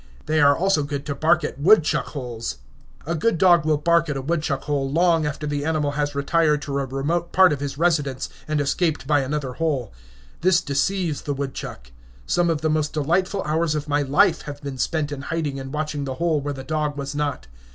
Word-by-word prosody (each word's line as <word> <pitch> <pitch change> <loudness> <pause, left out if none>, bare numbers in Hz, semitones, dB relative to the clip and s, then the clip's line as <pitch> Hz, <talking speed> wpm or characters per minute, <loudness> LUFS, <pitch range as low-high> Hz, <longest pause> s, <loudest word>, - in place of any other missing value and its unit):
They 155 -1 +2
are 145 0 +5
also 190 -4 +2
good 140 -1 -4
to 145 - -2
bark 160 +4 +2
at 150 - -4
woodchuck 165 0 +4
holes. 120 - -5 0.5
A 165 - -1
good 170 +4 +1
dog 175 -3 +5
will 155 -1 +3
bark 170 +1 +2
at 145 - -2
a - - -3
woodchuck 155 -3 -1
hole 140 -2 -1
long 165 -1 +3
after 150 +1 -4
the 145 -1 -2
animal 155 -2 0
has 145 0 -2
retired 150 +1 +2
to 140 -1 -2
a 135 - -1
remote 155 +6 -2
part 185 -4 +6
of 140 - -4
his 140 -1 -4
residence, 145 -6 +1 0.2
and 155 -1 0
escaped 145 +2 0
by 145 +1 +3
another 135 -1 -2
hole. 140 -7 -2 0.5
This 180 0 +4
deceives 160 +2 -1
the 145 - -3
woodchuck. 135 - -6 0.3
Some 175 -1 +1
of 160 -3 0
the 160 - +1
most 155 -1 0
delightful 180 +6 0
hours 155 +1 0
of 150 0 -3
my 145 0 +1
life 165 +5 +3
have 145 0 -7
been 135 -2 -6
spent 155 -1 -1
in 140 -2 -5
hiding 145 -2 -3
and 135 0 -7
watching 150 -1 -3
the 130 -1 -4
hole 165 -1 0
where 145 +1 -3
the 135 - -7
dog 150 0 -2
was 140 0 -4
not. 145 - -2
150 Hz, 215 wpm, -23 LUFS, 140-165 Hz, 0.5 s, part